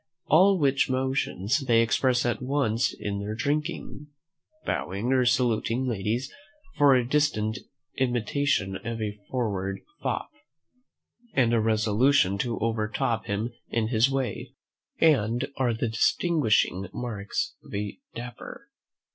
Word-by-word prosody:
All 190 +5 +5
which 140 -4 +2
motions 130 -3 0
they 120 -5 +3
express 125 +2 +2
at 120 - -1
once 125 -4 +1
in 100 -1 -4
their 105 +2 -4
drinking, 150 +3 -3 0.6
bowing 100 +8 -1
or 130 -2 +3
saluting 120 0 +1
ladies; 115 +3 -2 0.4
for 145 -2 +6
a 125 -2 +1
distant 120 -7 +1 0.4
imitation 120 -4 0
of 115 +3 -5
a 105 -1 -4
forward 100 -6 -2 0.2
fop, - - -2 1.0
and 120 -3 +3
a 115 - +4
resolution 110 0 +3
to 120 +1 -1
overtop 110 0 -1
him 105 +4 -2 0.2
in 110 -2 0
his 115 +2 +3
way, 135 -2 -3 0.4
are 130 -2 +2
the 115 0 -1
distinguishing 115 - +2
marks 105 -5 -3
of - - -15
a 100 0 -4 0.2
Dapper. 120 0 -9
120 Hz, 120 wpm, -26 LUFS, 110-135 Hz, 1.0 s, for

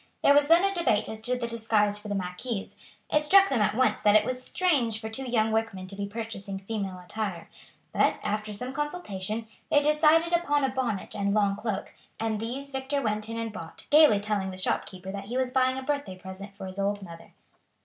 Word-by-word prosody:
There 280 - +7
was 290 0 +5
then 335 +3 +6
a 395 0 +2
debate 225 - +1
as 220 0 -6
to 250 +3 -1
the 245 - -3
disguise 220 -3 +1
for 210 - -10
the 205 - -2
marquise; 195 +4 -4 0.4
it 300 - +3
struck 390 +5 +6
them 255 -5 +1
at 210 - +2
once 255 +1 +2
that 210 0 +5
it 215 0 +5
was 255 +1 -1
strange 255 -11 +1
for 220 -1 -5
two 255 +3 -4
young 220 -2 +2
workmen 220 -4 -1
to 190 +1 -8
be 200 0 -3
purchasing 205 -2 -5
female 195 -1 -4
attire, 180 -1 -5 0.4
but, - - +3
after 210 +1 -2
some 250 +5 -5
consultation, 230 - -3 0.2
they 290 - +5
decided 305 +3 +4
upon 295 -4 +2
a 270 - +2
bonnet 250 -6 -3
and 200 0 0
long 200 -2 +3
cloak, 210 -1 -4 0.3
and 220 -1 -1
these 265 +5 -5
Victor 265 +1 -2
went 215 -3 -2
in 230 - -4
and 225 -1 -3
bought, 165 -6 -8
gaily 295 -8 +7
telling 205 -2 -1
the 185 - -7
shopkeeper 185 0 -3
that 200 0 -6
he 240 +5 -3
was 260 -1 +1
buying 260 0 +2
a 265 - -4
birthday 285 -9 -2
present 190 +2 -9
for 195 - -8
his 185 +1 -6
old 200 0 -1
mother. 170 -2 -12
220 Hz, 215 wpm, -27 LUFS, 200-265 Hz, 0.4 s, There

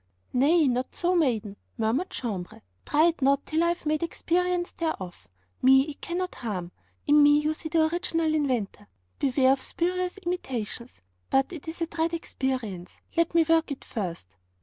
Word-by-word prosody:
'Nay, 295 +5 +4
not 250 0 -1
so, 360 +1 +1
maiden,' 225 - 0 0.2
murmured 230 +10 0
Jambres, 185 - -5 0.2
'try 305 +2 +4
it 335 - -5
not 275 +1 +3
till 320 +2 +1
I - - +3
have 345 -2 -2
made 305 0 +1
experience 350 +1 0
thereof. 195 - -4 0.3
Me 265 +1 +7
it 290 0 -8
cannot 360 +1 -3
harm; 185 -7 -5 0.3
in 295 0 +6
me 290 0 +7
you 300 +1 +1
see 315 +1 -6
the 320 -1 +3
original 330 -1 0
inventor; 245 -9 -1 0.3
beware 265 -1 +3
of 270 - -3
spurious 360 +4 -1
imitations. 260 - -5 0.3
But 270 +6 +2
it 325 -2 -9
is 325 +1 -6
a - - +2
dread 330 +1 -1
experience; 250 - -4 0.2
let 335 0 +1
me 330 -1 +5
work 325 -1 +3
it 280 - -6
first!' 170 - -5
295 Hz, 170 wpm, -27 LUFS, 245-335 Hz, 0.3 s, Me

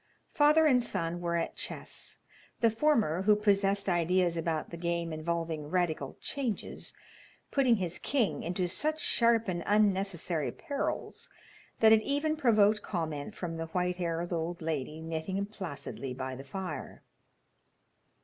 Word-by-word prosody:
Father 300 +1 +5
and 255 -5 +5
son 175 -6 -2
were 170 -1 -1
at 170 - -1
chess, - - -5 0.4
the 230 -1 +4
former, 225 - +2
who 210 +2 +5
possessed 200 -1 +2
ideas 175 0 +2
about 165 -1 -2
the 170 - -6
game 170 -1 -2
involving 160 -1 -2
radical 160 -6 -1
changes, 255 -7 -4 0.6
putting 260 -4 +4
his 180 -5 -3
king 255 -7 0
into 180 +2 -1
such 310 - -1
sharp 230 -5 +3
and 175 -2 -1
unnecessary 195 -6 +2
perils 285 -1 -4 0.5
that 220 0 +8
it 220 - +5
even 290 +5 0
provoked 215 -7 +4
comment 155 -6 -4
from 165 -2 -4
the 165 0 -4
white 180 +1 -1
haired 175 0 -2
old 170 +1 -2
lady 155 -1 -3
knitting 165 +5 -2
placidly 150 -9 -6
by 130 0 -4
the 135 - -8
fire. 180 +3 -6
180 Hz, 140 wpm, -31 LUFS, 165-215 Hz, 0.6 s, that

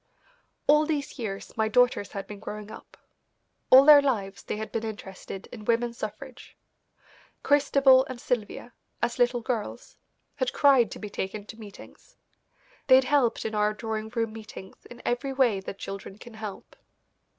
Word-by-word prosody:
All 300 +1 +4
these 295 -3 -3
years 200 -4 -6
my 220 -1 +1
daughters 245 -2 +2
had 195 -1 -5
been 205 0 -10
growing 210 0 -8
up. - - -13 0.7
All 265 +2 +9
their 295 -1 +9
lives 205 -8 -2
they - - -5
had 220 0 -6
been 225 - -3
interested 195 -3 -8
in 220 -3 -9
women's 235 +1 0
suffrage. 240 +5 -8 0.9
Christabel 275 -2 +5
and 255 -2 -8
Sylvia, 240 0 -3 0.3
as 240 - -1
little 245 0 +2
girls, 230 -3 -5 0.4
had 255 -2 -1
cried 270 -6 +4
to - - -8
be 210 -1 -8
taken 200 +2 -5
to 220 +2 -11
meetings. 205 -3 -14 0.7
They 260 - +8
had 265 - +5
helped 260 -3 +1
in 220 - -3
our 210 0 +1
drawing 220 0 -4
room 225 -1 -2
meetings 215 -3 -11
in 240 0 -13
every 270 +3 -1
way 250 -7 +2
that 190 +1 -8
children 195 0 -8
can 240 +1 -13
help. 215 -2 -9
230 Hz, 160 wpm, -27 LUFS, 210-260 Hz, 0.9 s, All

